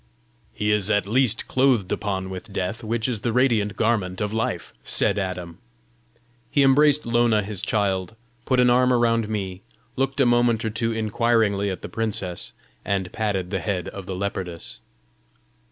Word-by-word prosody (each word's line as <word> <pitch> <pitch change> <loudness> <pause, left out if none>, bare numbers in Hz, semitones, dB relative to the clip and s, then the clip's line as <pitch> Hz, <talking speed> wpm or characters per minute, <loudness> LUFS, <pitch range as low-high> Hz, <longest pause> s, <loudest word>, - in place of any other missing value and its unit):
"He 105 0 -1
is 105 -1 +2
at 105 -3 +2
least 120 +1 +2
clothed 130 -8 +2
upon 95 -2 -2
with 95 +3 -8
Death, 95 +4 -3
which 115 +1 -1
is 115 -5 -2
the 120 - 0
radiant 115 -4 +2
garment 105 -5 0
of 105 0 -2
Life," 110 0 -2
said - - +2
Adam. 90 -3 -5 0.9
He 140 - +3
embraced 145 +2 +4
Lona 115 -2 +2
his 100 -2 -3
child, 100 -1 -1 0.3
put 130 -1 +2
an 125 -1 +5
arm 125 +1 +4
around 115 -3 +2
me, 95 -3 -4 0.3
looked 135 +1 -1
a 135 - +5
moment 120 -2 +2
or 110 - -1
two 115 +1 -1
inquiringly 110 -2 +1
at 95 - -5
the - - -4
princess, 100 -6 -3 0.3
and 95 -2 -2
patted 100 -4 -2
the 95 - -1
head 90 +2 -2
of 100 -1 -9
the 95 - -4
leopardess. 90 -9 -5
105 Hz, 165 wpm, -23 LUFS, 95-120 Hz, 0.9 s, an